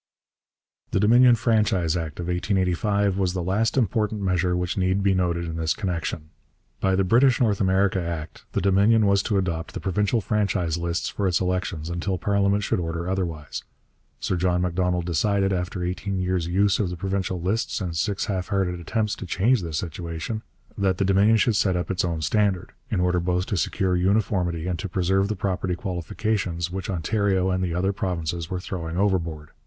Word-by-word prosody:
The -, -, 0 dB
Dominion 120 Hz, +4 st, +6 dB
Franchise 105 Hz, -8 st, +1 dB
Act 80 Hz, -3 st, -4 dB
of 85 Hz, -, -3 dB
1885 95 Hz, +2 st, 0 dB
was 90 Hz, -2 st, +1 dB
the 90 Hz, -2 st, -2 dB
last 105 Hz, +8 st, 0 dB
important 105 Hz, -2 st, 0 dB
measure 90 Hz, -1 st, +1 dB
which 90 Hz, +1 st, -2 dB
need 95 Hz, +1 st, +1 dB
be 100 Hz, -1 st, +3 dB
noted 85 Hz, -2 st, 0 dB
in 80 Hz, 0 st, -4 dB
this 80 Hz, -1 st, 0 dB
connection. 85 Hz, -5 st, -3 dB, 0.5 s
By 95 Hz, -1 st, +2 dB
the 95 Hz, -, +2 dB
British 120 Hz, +6 st, +4 dB
North 110 Hz, -6 st, +2 dB
America 95 Hz, 0 st, +2 dB
Act 85 Hz, -2 st, -6 dB
the -, -, 0 dB
Dominion 100 Hz, +4 st, +4 dB
was 100 Hz, -1 st, +4 dB
to 100 Hz, 0 st, 0 dB
adopt 85 Hz, -4 st, -2 dB
the -, -, -2 dB
provincial 105 Hz, +5 st, +1 dB
franchise 100 Hz, -5 st, 0 dB
lists 85 Hz, 0 st, -2 dB
for 100 Hz, -, -1 dB
its 90 Hz, -2 st, +2 dB
elections 90 Hz, -3 st, -2 dB
until 85 Hz, +2 st, -2 dB
parliament 100 Hz, +2 st, +1 dB
should -, -, 0 dB
order 85 Hz, 0 st, -3 dB
otherwise. 85 Hz, -6 st, -3 dB, 0.6 s
Sir 95 Hz, -, -1 dB
John 90 Hz, 0 st, +1 dB
Macdonald 90 Hz, 0 st, 0 dB
decided, 95 Hz, +3 st, +1 dB
after 90 Hz, 0 st, -2 dB
eighteen 95 Hz, +2 st, -2 dB
years' 90 Hz, -2 st, 0 dB
use 100 Hz, +3 st, +2 dB
of 100 Hz, -5 st, 0 dB
the 90 Hz, -, -5 dB
provincial 95 Hz, 0 st, -2 dB
lists 95 Hz, +7 st, -1 dB
and 90 Hz, -4 st, -4 dB
six 95 Hz, +4 st, -1 dB
half 95 Hz, -3 st, -2 dB
hearted 95 Hz, -4 st, -1 dB
attempts 105 Hz, +4 st, -1 dB
to 95 Hz, -, -7 dB
change 110 Hz, +7 st, +2 dB
this 80 Hz, -3 st, -3 dB
situation, 85 Hz, +5 st, -4 dB, 0.3 s
that 95 Hz, -3 st, +1 dB
the 100 Hz, -, +1 dB
Dominion 100 Hz, +4 st, +4 dB
should 110 Hz, +1 st, +2 dB
set 95 Hz, -3 st, +2 dB
up 90 Hz, -, -2 dB
its 90 Hz, -, 0 dB
own 85 Hz, -3 st, -2 dB
standard, 100 Hz, +2 st, +1 dB, 0.2 s
in -, -, 0 dB
order 90 Hz, 0 st, +2 dB
both 90 Hz, +1 st, 0 dB
to 100 Hz, -, -2 dB
secure 90 Hz, +1 st, 0 dB
uniformity 90 Hz, -3 st, +1 dB
and 90 Hz, -2 st, -2 dB
to 95 Hz, -, -4 dB
preserve 95 Hz, +2 st, +1 dB
the 110 Hz, -, -2 dB
property 95 Hz, -1 st, -1 dB
qualifications 90 Hz, -1 st, -2 dB
which 95 Hz, +3 st, -5 dB
Ontario 95 Hz, +1 st, +1 dB
and 95 Hz, 0 st, 0 dB
the 85 Hz, -2 st, -1 dB
other 95 Hz, +3 st, +1 dB
provinces 85 Hz, -4 st, -3 dB
were 90 Hz, -, -2 dB
throwing 85 Hz, -3 st, -5 dB
overboard. 85 Hz, -6 st, -1 dB
95 Hz, 185 wpm, -24 LUFS, 85-100 Hz, 0.6 s, Dominion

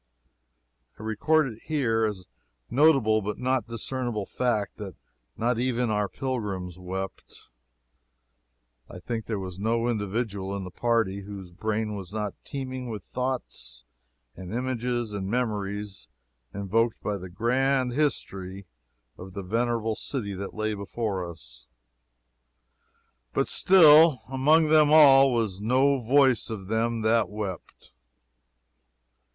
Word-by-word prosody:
I -, -, -9 dB
record 150 Hz, +9 st, +2 dB
it 115 Hz, -4 st, -7 dB
here 120 Hz, -8 st, +1 dB
as 105 Hz, -3 st, -3 dB
a -, -, -21 dB
notable 130 Hz, -7 st, +4 dB
but 105 Hz, +1 st, -4 dB
not 130 Hz, -2 st, 0 dB
discreditable 115 Hz, -2 st, -3 dB
fact 115 Hz, -4 st, -1 dB
that 100 Hz, -4 st, -7 dB, 0.4 s
not 120 Hz, +1 st, 0 dB
even 125 Hz, -2 st, 0 dB
our 105 Hz, -1 st, 0 dB
pilgrims 100 Hz, -, -4 dB
wept. 95 Hz, -4 st, -7 dB, 1.4 s
I -, -, -9 dB
think 110 Hz, +5 st, -4 dB
there 110 Hz, -, -2 dB
was 95 Hz, -1 st, -6 dB
no 115 Hz, +3 st, 0 dB
individual 105 Hz, -3 st, -2 dB
in 100 Hz, -, -5 dB
the 90 Hz, -, -8 dB
party 115 Hz, -3 st, 0 dB
whose 100 Hz, -2 st, -9 dB
brain 110 Hz, +3 st, -2 dB
was 95 Hz, -3 st, -7 dB
not 105 Hz, -2 st, -3 dB
teeming 130 Hz, -2 st, -5 dB
with 105 Hz, -4 st, -6 dB
thoughts 95 Hz, -, -4 dB, 0.5 s
and 95 Hz, -1 st, -9 dB
images 120 Hz, -2 st, -2 dB
and 100 Hz, -2 st, -3 dB
memories 105 Hz, -4 st, -3 dB, 0.4 s
invoked 105 Hz, +4 st, 0 dB
by 105 Hz, -2 st, -2 dB
the 90 Hz, 0 st, -8 dB
grand 125 Hz, +5 st, +1 dB
history 100 Hz, -9 st, -2 dB, 0.5 s
of 95 Hz, +1 st, -10 dB
the 100 Hz, 0 st, -5 dB
venerable 115 Hz, +2 st, 0 dB
city 110 Hz, -4 st, -4 dB
that 95 Hz, +1 st, -6 dB
lay 110 Hz, 0 st, -1 dB
before 100 Hz, -3 st, -3 dB
us, -, -, -14 dB, 1.7 s
but -, -, +1 dB
still 160 Hz, -7 st, +6 dB
among 150 Hz, +4 st, +4 dB
them 155 Hz, -1 st, +5 dB
all 135 Hz, -3 st, +8 dB
was 110 Hz, -5 st, -1 dB
no 130 Hz, +5 st, +3 dB
"voice 130 Hz, +1 st, +3 dB
of 100 Hz, -4 st, -6 dB
them 115 Hz, +1 st, 0 dB
that 110 Hz, -3 st, +2 dB
wept." 105 Hz, -4 st, -7 dB
110 Hz, 125 wpm, -26 LUFS, 100-125 Hz, 1.7 s, all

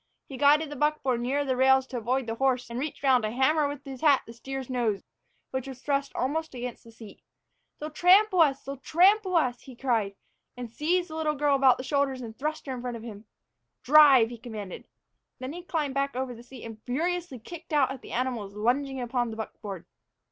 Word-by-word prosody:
He 270 Hz, -, -9 dB
guided 290 Hz, +3 st, +4 dB
the -, -, -5 dB
buckboard 270 Hz, -4 st, 0 dB
nearer 275 Hz, +4 st, 0 dB
the 260 Hz, -2 st, 0 dB
rails 265 Hz, +1 st, +4 dB
to 260 Hz, -, -6 dB
avoid 250 Hz, +3 st, -1 dB
the 225 Hz, -, -3 dB
horse 250 Hz, 0 st, 0 dB
and 235 Hz, -, -3 dB
reached 290 Hz, +1 st, -5 dB
round 260 Hz, -3 st, +4 dB
to 215 Hz, -, 0 dB
hammer 285 Hz, +6 st, +2 dB
with 285 Hz, -1 st, -7 dB
his 270 Hz, -2 st, -8 dB
hat 290 Hz, -4 st, +4 dB
the 230 Hz, -, -11 dB
steer's 265 Hz, +2 st, -6 dB
nose, 235 Hz, -6 st, -1 dB, 0.5 s
which 260 Hz, 0 st, -3 dB
was 265 Hz, -2 st, -8 dB
thrust 280 Hz, +1 st, -1 dB
almost 315 Hz, +2 st, -2 dB
against 245 Hz, -1 st, -6 dB
the 230 Hz, -, -15 dB
seat. 225 Hz, -2 st, -13 dB, 0.6 s
"They'll 305 Hz, +1 st, -6 dB
trample 370 Hz, +3 st, +5 dB
us, 275 Hz, -4 st, +3 dB
they'll 275 Hz, +1 st, -6 dB
trample 370 Hz, +6 st, +3 dB
us!" 255 Hz, -7 st, +1 dB
he 260 Hz, -, -12 dB
cried, 225 Hz, -6 st, 0 dB, 0.4 s
and 245 Hz, -2 st, -6 dB
he -, -, -28 dB
seized 345 Hz, +5 st, 0 dB
the -, -, -6 dB
little 310 Hz, -1 st, 0 dB
girl 290 Hz, 0 st, +2 dB
about 265 Hz, -2 st, +5 dB
the 255 Hz, -, -6 dB
shoulders 270 Hz, -1 st, 0 dB
and 220 Hz, -1 st, -8 dB
thrust 305 Hz, +5 st, -4 dB
her 270 Hz, -, -4 dB
in 250 Hz, -, -6 dB
front 245 Hz, -1 st, -4 dB
of 225 Hz, -, -11 dB
him. 215 Hz, -2 st, -9 dB, 0.6 s
"Drive," 275 Hz, -5 st, +7 dB
he 240 Hz, -, -8 dB
commanded. 215 Hz, -5 st, -8 dB, 0.5 s
Then 260 Hz, +3 st, -6 dB
he 350 Hz, -, -7 dB
climbed 310 Hz, -5 st, -2 dB
back 275 Hz, -1 st, -1 dB
over 260 Hz, -1 st, -3 dB
the 235 Hz, -, -12 dB
seat 245 Hz, 0 st, -12 dB
and 225 Hz, -1 st, -9 dB
furiously 335 Hz, +3 st, -2 dB
kicked 330 Hz, +9 st, -11 dB
out 285 Hz, -3 st, +3 dB
at 270 Hz, -, -7 dB
the -, -, -11 dB
animals 235 Hz, -5 st, -3 dB
lunging 265 Hz, +5 st, 0 dB
upon 245 Hz, -1 st, -1 dB
the 220 Hz, -, -7 dB
buckboard. 205 Hz, -4 st, -7 dB
265 Hz, 220 wpm, -27 LUFS, 240-295 Hz, 0.6 s, Drive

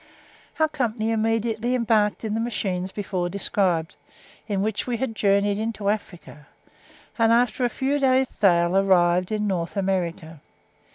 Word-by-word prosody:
Our 315 Hz, -, +4 dB
company 230 Hz, -7 st, -2 dB
immediately 225 Hz, +2 st, 0 dB
embarked 225 Hz, -3 st, +1 dB
in 215 Hz, -, -2 dB
the 220 Hz, -, -1 dB
machines 195 Hz, -5 st, -2 dB
before 185 Hz, -4 st, -3 dB
described, 180 Hz, -3 st, 0 dB, 0.5 s
in 200 Hz, -3 st, -1 dB
which 215 Hz, +2 st, -2 dB
we 240 Hz, -1 st, -1 dB
had 240 Hz, -1 st, -3 dB
journeyed 200 Hz, 0 st, +2 dB
into 215 Hz, -2 st, -2 dB
Africa, 175 Hz, -8 st, -5 dB, 0.7 s
and 225 Hz, 0 st, +4 dB
after 245 Hz, +1 st, +2 dB
a -, -, +1 dB
few 275 Hz, +4 st, -1 dB
days' 260 Hz, -1 st, +2 dB
sail 175 Hz, -3 st, +2 dB
arrived 180 Hz, -2 st, +3 dB
in 210 Hz, -1 st, -1 dB
North 180 Hz, -1 st, -2 dB
America. 170 Hz, -5 st, -2 dB
210 Hz, 140 wpm, -24 LUFS, 185-230 Hz, 0.7 s, Our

